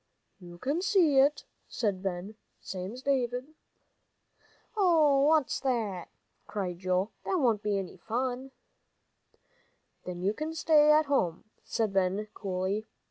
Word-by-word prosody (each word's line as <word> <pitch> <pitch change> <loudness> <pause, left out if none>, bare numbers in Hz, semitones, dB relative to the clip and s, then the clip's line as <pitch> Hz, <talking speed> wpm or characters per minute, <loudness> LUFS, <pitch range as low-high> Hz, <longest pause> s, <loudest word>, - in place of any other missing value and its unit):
"You 175 -2 -12
can 280 - -1
see 365 -8 +4
it," 285 +2 +3 0.2
said 200 -5 -2
Ben, 190 +2 -4 0.3
"same's 195 +7 -6
David." 260 +1 -1 1.2
"Hoh! 310 -9 +4
what's 310 -3 +2
that!" 220 -9 -2 0.4
cried 185 -4 -4
Joel; 185 +3 0
"that 385 - -1
won't 235 - +2
be 205 -1 0
any 195 -2 -5
fun." 255 +3 -3 1.6
"Then 180 0 -5
you 200 +2 +2
can 310 +5 -4
stay 300 -2 +5
at 305 +1 +5
home," 185 - 0 0.2
said 220 -3 -1
Ben, 195 +2 0
coolly. 195 +2 -2
230 Hz, 125 wpm, -29 LUFS, 190-285 Hz, 1.6 s, stay